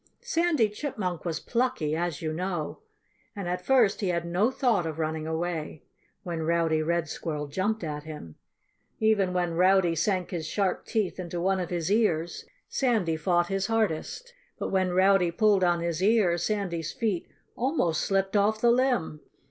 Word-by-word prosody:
Sandy 335 - +2
Chipmunk 205 - -4
was 165 -2 -2
plucky 235 -11 -1
as 170 -2 -2
you 155 -1 -2
know. 175 -2 -3 0.6
And 200 -3 -5
at 180 +1 -2
first 245 -7 +3
he 200 - 0
had 170 -1 -1
no 180 +7 +2
thought 245 -9 +1
of 160 -1 -5
running 160 0 -2
away, 160 -2 -3 0.4
when 170 -4 -4
Rowdy 165 -1 +1
Red 170 0 0
Squirrel 150 -1 -4
jumped 190 +8 -2
at 150 -2 -4
him. 150 - -9 0.7
Even 215 -4 +2
when 175 -2 0
Rowdy 180 0 +4
sank 180 +2 0
his 165 -4 -3
sharp 190 +1 -1
teeth 215 -5 -1
into 175 -1 -4
one 190 +2 +1
of 180 - -3
his 175 +1 -2
ears, 175 -7 +1 0.2
Sandy 220 - +1
fought 175 +2 +1
his 195 0 -1
hardest. 225 - -1 0.2
But - - -3
when 190 -1 +2
Rowdy 185 0 +4
pulled 200 +2 +3
on 175 -1 +2
his 170 0 -2
ear, 200 -4 +4
Sandy's 175 -3 -2
feet 220 -9 -2 0.3
almost 235 - 0
slipped 195 +1 0
off 210 +2 +3
the 235 +1 +4
limb. 245 - +1
180 Hz, 165 wpm, -27 LUFS, 165-210 Hz, 0.7 s, Rowdy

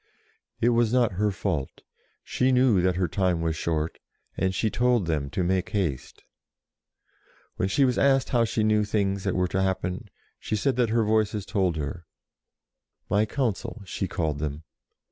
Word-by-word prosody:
It 120 - +3
was 120 -2 +2
not 125 -3 +3
her 105 +3 0
fault. 95 -8 -3 0.4
She 130 +1 +1
knew 125 -7 +4
that 90 0 +1
her 90 -1 0
time 90 0 0
was 80 -1 -1
short, 80 -1 -2 0.4
and 95 - 0
she 110 - 0
told 120 -5 +2
them 75 -4 -1
to 90 +4 -1
make 95 +1 0
haste. 85 -11 -3 1.3
When 95 - 0
she 135 +7 +3
was 125 -2 +1
asked 135 -1 +3
how 120 -3 +3
she 110 -1 0
knew 105 0 +3
things 100 -2 -1
that 95 - 0
were 90 0 +1
to 95 - 0
happen, 95 +2 -2 0.3
she - - -3
said 130 +5 0
that 125 -2 +3
DEFEATS 110 - -2
THE 115 - +4
ENGLISH 110 -1 +2
63 105 0 -7
her 100 - +3
Voices 90 -3 +1
told - - -5
her, 75 +3 -5 1.1
"my 105 +2 +3
Council," 115 -3 -2
she 95 +1 -3
called 80 -5 -2
them. 75 +1 -4
100 Hz, 185 wpm, -26 LUFS, 90-115 Hz, 1.3 s, knew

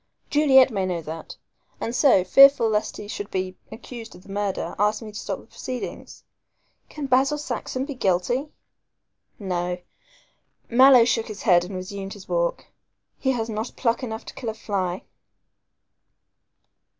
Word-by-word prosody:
Juliet 270 -3 +6
may 195 -3 -1
know 175 -3 -3
that, 160 +2 -8 0.4
and 230 - -3
so, 250 -11 +5
fearful 275 +5 +7
lest 215 -1 -1
he 205 - -8
should 205 -1 -6
be 185 0 -3 0.2
accused 230 0 -9
of 180 - -15
the 195 - -12
murder, 200 -1 -2
asked 210 +2 +1
me 215 - -8
to 210 - -7
stop - - -5
proceedings. 255 -1 -7 0.7
Can 300 -2 -6
Basil 270 +3 +3
Saxon 260 -1 -4
be 285 - -5
guilty? 235 +5 0 0.9
No," 180 -3 -2 0.9
Mallow 255 0 +7
shook 230 -1 0
his 215 -2 -8
head 175 -5 +5
and 190 +1 -7
resumed 195 +1 -6
his 205 -3 -13
walk, - - -1 0.5
"he 265 -1 +1
has 225 -2 -2
not 220 +1 -4
pluck 235 0 0
enough 220 -3 -5
to - - -9
kill 235 - -5
a 220 - -5
fly." 190 -4 -3
220 Hz, 150 wpm, -24 LUFS, 195-255 Hz, 0.9 s, fearful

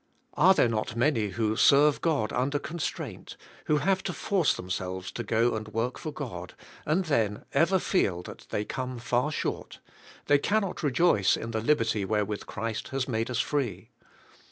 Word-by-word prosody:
Are 185 +6 +5
there - - +4
not 110 -1 -2
many 120 -3 +2
who 110 +1 -1
serve 145 +4 +5
God 150 -10 0
under 135 +4 0
constrain 160 +2 -5
t, - - -10 0.3
who 150 - +2
have 190 +6 +1
to - - -2
force 185 -6 +1
them 90 - -7
selves 90 0 -3
to 120 - -4
g 110 - -3
o 115 +2 +3
and 110 -1 -4
work 115 +3 -2
for 155 - -5
God, 110 - -7 0.3
and 175 +5 +2
then 115 -6 0
ever 165 +7 +4
feel 95 - 0
that - - -11
they 105 - -2
come 130 +1 -4
far 125 +5 0
short; - - -4 0.5
they 145 0 +4
cannot 200 +3 0
rejoice 140 - +3
in 115 - -5
the 110 -1 -1
liberty 115 -5 +1
wherewith 105 0 -1
Christ 110 +1 -4
has 135 -1 -2
made 115 -2 -1
us 125 +1 +1
free. 125 -7 -3
120 Hz, 180 wpm, -28 LUFS, 110-150 Hz, 0.5 s, Are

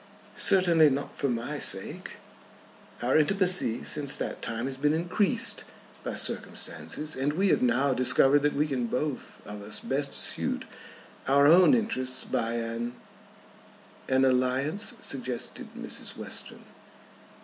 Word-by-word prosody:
"Certainly 170 -5 +5
not 140 +1 -4
for 140 - -1
my 115 -1 -3
sake." - - -3 0.9
"Our 130 +5 +3
intimacy 180 - +2
since 145 -2 0
that - - -5
time 115 +1 -2
has 135 0 -3
been 145 +3 +1
increased 175 +4 0 0.4
by - - -4
circumstances, 115 - -2
and 140 +3 -1
we 190 +4 +1
have - - +2
now 125 +3 +2
discovered 135 +3 +4
that 145 0 0
we 150 +2 +2
can 130 -5 -2
both 140 +3 -4
of 105 0 -8
us 105 +1 -1
best 140 +1 -2
suit - - 0 0.6
our 140 +1 +4
own 180 - +7
interests 130 - -1
by 115 +1 -2
an 115 +1 -4 0.6
" - - -22
"An 130 0 +3
alliance," 130 - 0
suggested 130 -3 -4
Mrs. - - -3
Western. - - -6
135 Hz, 135 wpm, -27 LUFS, 125-155 Hz, 0.9 s, own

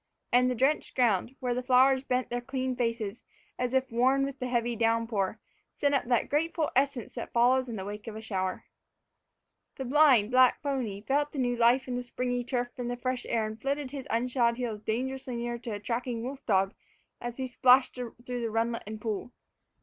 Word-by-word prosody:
And 250 +1 +5
the 250 - 0
drenched 270 +6 +1
ground, 235 0 +2
where 250 -1 0
the 250 - -1
flowers 260 +1 +4
bent 255 -2 -1
their 245 0 -1
clean 260 0 -2
faces 230 -3 -2 0.4
as 250 -1 0
if 265 -1 +1
worn 260 +4 +3
with 275 0 -6
the 255 - -2
heavy 240 -1 0
downpour, 225 -3 0 0.4
sent 285 0 +1
up 275 - +2
that 240 -1 +1
grateful 315 +1 0
essence 270 -3 0
that - - -6
follows 255 +2 +3
in 230 - -4
the 190 -2 -5
wake 210 +2 -7
of 220 - -6
a - - -5
shower. 190 -4 -3 1.1
The 265 - -5
blind, 255 -5 +5
black 255 0 +5
pony 250 -8 -2
felt 290 +5 0
the - - -6
new 245 -2 +1
life 240 +3 +3
in 250 -1 -2
the - - -2
springy 245 0 -2
turf 245 -1 -2
and 245 -1 -2
the 245 - -3
fresh 255 0 -3
air 225 -2 +1
and 215 +1 -7
flirted 275 -1 -2
his 280 -1 -6
unshod 235 0 +1
heels 230 -4 -3
dangerously 260 +3 -3
near 235 0 -3
to 235 - -7
a 205 -2 -3
tracking 235 +1 -3
wolf 265 +2 -6
dog 195 -2 +2 0.5
as 240 0 -5
he 260 - -2
splashed 255 +1 +4
through 245 -2 -6 0.4
runlet 230 +1 0
and 215 0 -7
pool. 220 +2 -3
245 Hz, 200 wpm, -29 LUFS, 230-260 Hz, 1.1 s, And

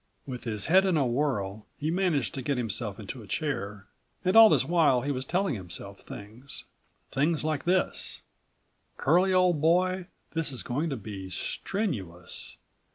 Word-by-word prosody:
With 125 -3 -6
his 105 -4 -2
head 185 +3 +6
in 180 -4 +3
a 140 - +3
whirl, 115 -6 -1
he 155 +2 -1
managed 175 -7 +1
to 135 - -4
get 140 +1 -1
himself 110 -3 -3
into 110 +4 -7
a 105 - -12
chair. 105 -9 -3 0.4
And 185 - +3
all 225 -1 +11
this - - +3
while 160 -7 +4
he 145 - 0
was 130 -1 -2
telling 185 +2 +1
himself 100 0 -6
things; 115 +7 -8 0.5
things 150 +3 +1
like 155 -2 -1
this:89 180 +1 -3
"Curlie, 180 +6 +5
old 180 -4 +4
boy, 180 +3 +3 0.3
this 165 -2 0
is 125 - -6
going 145 +7 -1
to 135 - -2
be 100 -3 -7
strenuous. 95 - -4
140 Hz, 160 wpm, -28 LUFS, 110-170 Hz, 0.5 s, all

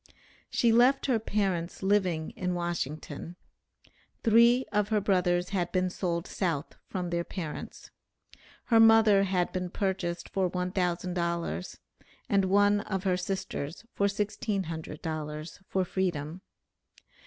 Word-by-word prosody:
She 235 - +3
left 250 +4 +4
her 250 -5 +2
parents 195 -5 -1
living 185 -5 +1
in 180 -1 -2
Washington. 170 -1 -4 0.9
Three 235 +3 +5
of 210 0 +1
her 215 -1 +3
brothers 180 -3 +1
had 180 -4 -1
been 185 -1 +1
sold 170 -2 -2
South 165 -6 -2
from 180 -2 -4
their 170 0 0
parents. 170 -4 -7 0.7
Her 230 -2 +4
mother 225 -3 +6
had 185 -2 0
been 180 -1 -3
purchased 185 -3 -2
for 190 -2 0
$1,000, 175 - -2 0.5
and 195 -1 +3
one 205 +2 +4
of 195 -2 -3
her 185 -2 +2
sisters 185 -2 -4
for 200 - +2
$1,600 165 -7 -4
for 190 -1 0
freedom. 175 -3 -2
185 Hz, 120 wpm, -29 LUFS, 170-200 Hz, 0.9 s, mother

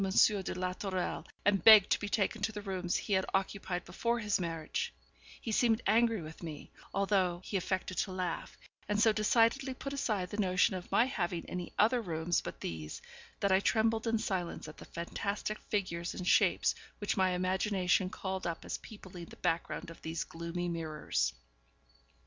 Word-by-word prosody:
de 195 0 +3
la 180 0 -1
Tourelle, 185 -1 -3 0.2
and 195 -4 +3
begged 215 -3 +9
to - - +4
be 205 - -4
taken 205 +1 0
to 220 - 0
the 210 -1 -6
rooms 185 -3 -2
he 205 - -1
had 190 0 +3
occupied 190 -2 -2
before 235 +7 -1
his 210 -3 0
marriage, 165 -3 -2 0.5
he 225 - -4
seemed 225 0 +3
angry 225 -3 +3
with 155 +1 -10
me, 160 -4 -7 0.2
although 190 -3 +1
he - - -5
affected 185 0 -1
to 190 - -1
laugh, 180 -2 -3 0.3
and 210 0 +1
so 220 0 +5
decidedly 230 +5 +3
put 275 +2 -5
aside 210 -9 -1
the 205 - -4
notion 185 -1 +3
of 180 -1 -7
my 235 - +5
having 175 -9 -2
any 180 -1 -5
other 235 +4 +4
rooms 165 -3 0
but - - -7
these, 80 -2 -5 0.4
that 200 - +2
I 190 - +6
trembled 225 +2 +2
in 225 0 +2
silence 190 -8 -3
at 155 - -10
the - - -10
fantastic 200 +5 -3
figures 175 -4 -2
and 180 - -5
shapes - - +4 0.2
which 205 - -1
my 185 -2 +3
imagination 185 0 +1
called 190 -1 -4
up 170 - -4
as - - -3
peopling 185 -5 -10
the - - -13
background 170 -1 -2
of 165 - -13
those 160 +1 -3
gloomy 170 +2 -4
mirrors. 160 - -1
190 Hz, 180 wpm, -32 LUFS, 175-210 Hz, 0.5 s, begged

